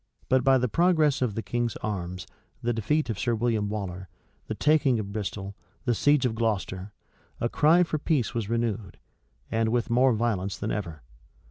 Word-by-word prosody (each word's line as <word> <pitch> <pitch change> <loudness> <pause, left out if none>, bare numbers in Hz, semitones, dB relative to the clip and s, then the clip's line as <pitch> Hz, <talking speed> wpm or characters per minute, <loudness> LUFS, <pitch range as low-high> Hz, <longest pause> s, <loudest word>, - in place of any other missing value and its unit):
But 130 -1 +3
by 135 0 +5
the 125 0 +1
progress 155 -1 +3
of 115 -5 0
the 115 - -3
king's 120 -1 -1
arms, 90 -4 -4 0.4
the 120 +1 +1
defeat 120 +5 0
of 105 - -5
Sir 120 -2 +1
William 110 -3 0
Waller, 95 -3 -5 0.4
the - - -3
taking 145 -5 +3
of 100 -2 -4
Bristol, 100 -1 -4 0.3
the 120 - +2
siege 145 +3 +3
of 120 - +1
Gloucester, 105 -3 -2 0.5
a 120 - +1
cry 160 +7 +5
for 160 -3 -2
peace 140 -6 0
was 115 -4 -3
renewed, 115 -4 -2 0.5
and 115 0 +1
with 120 +1 0
more 125 +2 +4
violence 105 -4 -1
than 110 - -3
ever. 85 - -4
115 Hz, 175 wpm, -27 LUFS, 100-130 Hz, 0.5 s, by